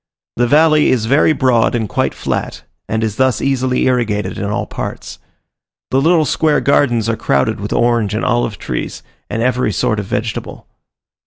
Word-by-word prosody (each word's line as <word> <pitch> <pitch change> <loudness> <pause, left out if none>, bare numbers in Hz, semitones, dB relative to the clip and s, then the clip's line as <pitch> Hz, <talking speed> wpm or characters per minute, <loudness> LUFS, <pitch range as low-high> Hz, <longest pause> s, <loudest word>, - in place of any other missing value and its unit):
The 120 +1 +2
valley 155 +2 +4
is 115 -4 +1
very 140 +6 +3
broad 125 -6 +2
and 110 -3 -1
quite - - -1
flat, - - -4 0.3
and 110 +1 -1
is 110 -2 -2
thus 130 -3 +2
easily 130 -2 0
irrigated 105 -6 -1
in - - -3
all 105 +1 -2
parts. - - -7 0.7
The 135 - +2
little 160 +1 +3
square 150 +2 +1
gardens 120 -5 +2
are 115 - 0
crowded 70 -10 0
with - - -5
orange 115 -4 +1
and 110 - -2
olive 120 -3 0
trees, 60 - -5 0.3
and 115 - -2
every 125 0 +1
sort 115 -4 0
of 100 - -5
vegetable. 110 +2 -4
120 Hz, 170 wpm, -16 LUFS, 110-130 Hz, 0.7 s, valley